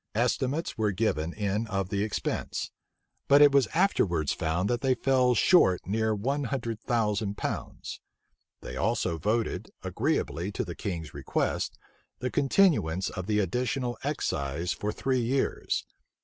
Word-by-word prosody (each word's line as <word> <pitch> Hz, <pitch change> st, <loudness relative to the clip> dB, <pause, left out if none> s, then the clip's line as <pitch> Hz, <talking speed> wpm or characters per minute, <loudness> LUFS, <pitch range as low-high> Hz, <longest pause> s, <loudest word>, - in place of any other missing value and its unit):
Estimates 130 Hz, +4 st, 0 dB
were 105 Hz, -2 st, +2 dB
given 85 Hz, -6 st, 0 dB
in 105 Hz, +3 st, -1 dB
of 95 Hz, -2 st, -2 dB
the 100 Hz, +1 st, 0 dB
expense; 105 Hz, -, -3 dB, 0.6 s
but 140 Hz, -, +7 dB
it 145 Hz, -1 st, +8 dB
was 140 Hz, -4 st, +4 dB
afterwards 95 Hz, -, +1 dB
found 85 Hz, +4 st, -1 dB
that 120 Hz, +1 st, 0 dB
they 130 Hz, -1 st, +2 dB
fell 125 Hz, -1 st, +3 dB
short 100 Hz, -, +4 dB
near 110 Hz, +2 st, +1 dB
one 135 Hz, +7 st, -1 dB
hundred 115 Hz, -3 st, -3 dB
thousand 105 Hz, -4 st, 0 dB
pounds. -, -, -5 dB, 0.6 s
They -, -, -7 dB
also 80 Hz, -, 0 dB
voted, 110 Hz, +5 st, -1 dB
agreeably 85 Hz, +7 st, -1 dB
to -, -, -2 dB
the 85 Hz, -, -5 dB
king's 85 Hz, -5 st, -5 dB
request, -, -, -2 dB, 0.4 s
the 125 Hz, 0 st, -3 dB
continuance 135 Hz, -, +2 dB
of 95 Hz, -1 st, -5 dB
the 105 Hz, -1 st, +1 dB
additional 120 Hz, +5 st, 0 dB
excise 85 Hz, -, -1 dB
for 105 Hz, -, -3 dB
three 130 Hz, +3 st, 0 dB
years. 130 Hz, +3 st, 0 dB
110 Hz, 140 wpm, -28 LUFS, 95-130 Hz, 0.6 s, it